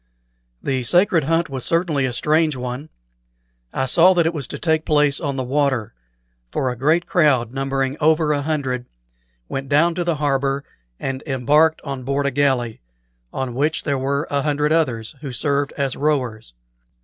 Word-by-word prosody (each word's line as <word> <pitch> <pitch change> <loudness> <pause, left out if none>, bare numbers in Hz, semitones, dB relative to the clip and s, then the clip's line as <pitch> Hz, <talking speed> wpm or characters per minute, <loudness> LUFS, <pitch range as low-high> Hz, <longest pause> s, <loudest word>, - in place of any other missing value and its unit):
The 130 -2 0
sacred 170 - +3
hunt 165 +2 +1
was 130 -2 -5
certainly 165 -5 +1
a - - -3
strange 155 +4 +2
one. 125 +4 -5 0.8
I 130 - -1
saw 175 +8 +5
that 170 -2 +3
it 165 - +1
was 145 -6 -4
to - - -6
take 160 -2 +1
place 150 -2 +2
on 140 -4 -2
the 130 - -2
water; 130 -4 0 0.6
for 130 - -1
a - - -5
great 155 +8 +2
crowd, 130 -8 +2
numbering 135 0 -1
over 155 0 +3
a 145 - -1
hundred, 135 -5 -2 0.6
went 135 - -5
down 165 +4 +3
to 175 +1 -2
the 170 -1 0
harbor 140 -1 0 0.4
and 135 0 -3
embarked 150 +4 +3
on 140 -3 -5
board 140 +2 -1
a 140 - +1
galley, 130 -5 0 0.5
on 130 -2 -3
which 150 +6 0
there 140 -2 -1
were 140 +3 -1
a 140 0 +1
hundred 150 +1 0
others, 120 -9 0
who 140 -3 -5
served 140 +2 -1
as 140 -3 -2
rowers. 125 - -2
140 Hz, 175 wpm, -21 LUFS, 130-155 Hz, 0.8 s, saw